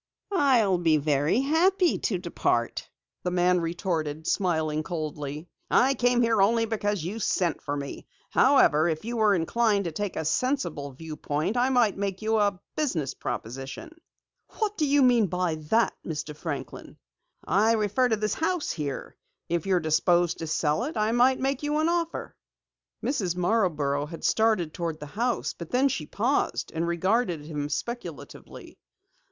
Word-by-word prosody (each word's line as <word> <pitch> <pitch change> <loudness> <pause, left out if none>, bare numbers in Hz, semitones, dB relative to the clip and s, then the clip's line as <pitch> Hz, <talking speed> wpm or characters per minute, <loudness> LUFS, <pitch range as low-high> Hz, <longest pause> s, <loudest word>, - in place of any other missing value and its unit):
"I'll 240 - +3
be 165 -3 +3
very 150 - +1
happy 345 +6 +2
to - - 0
depart," - - -1 0.3
the 180 - -1
man 180 0 +2
retorted, 165 -3 -2
smiling 160 -6 0
coldly. 155 -2 -5 0.2
"I 265 +2 +4
came 245 -2 +2
here 225 -3 +3
only 225 +3 +3
because 205 -5 -2
you 195 +7 -4
sent 180 -5 0
for 145 0 -3
me. 140 -1 -7 0.2
However, 155 +4 +4
if 160 +4 -3
you 235 +1 -3
were 215 -2 +4
inclined 205 +4 +1
to 170 - -2
take 205 +4 -4
a 160 - -3
sensible 170 - -1
viewpoint, 155 - -3
I 250 +1 +2
might 240 -6 +2
make 200 0 -3
you 220 0 +2
a 200 -3 +1 0.2
business 170 - -1
proposition." 135 - -6 0.7
"What 425 -2 -1
do 310 -6 0
you 285 0 +4
mean 240 -5 +4
by 180 -2 -1
that, 230 +1 +3
Mr. 150 -2 -5
Franklin?" 145 -5 -6 0.5
"I 220 +4 +3
refer 220 +4 +1
to 225 - +3
this 215 -1 -1
house 325 0 -1
here. 145 -4 -5 0.3
If 170 +1 -1
you're 185 -2 +3
disposed 175 +2 +2
to 165 - -4
sell 155 +7 0
it 305 - -5
I 215 +1 +1
might 250 +2 +4
make 270 0 -1
you 295 0 -1
an 310 +1 +2
offer." 340 -1 -2 0.7
Mrs. 195 - -1
Marborough 160 -8 +1
had 165 +1 -9
started 215 -8 +2
toward 165 -3 -3
the 150 - -7
house, 235 +2 -1
but 170 -2 -9
then 265 +3 +3
she 160 - -3
paused 245 +7 -1
and 165 +1 -1
regarded 175 -1 0
him 150 -2 -4
speculatively. 240 +9 -7
190 Hz, 160 wpm, -26 LUFS, 160-240 Hz, 0.7 s, I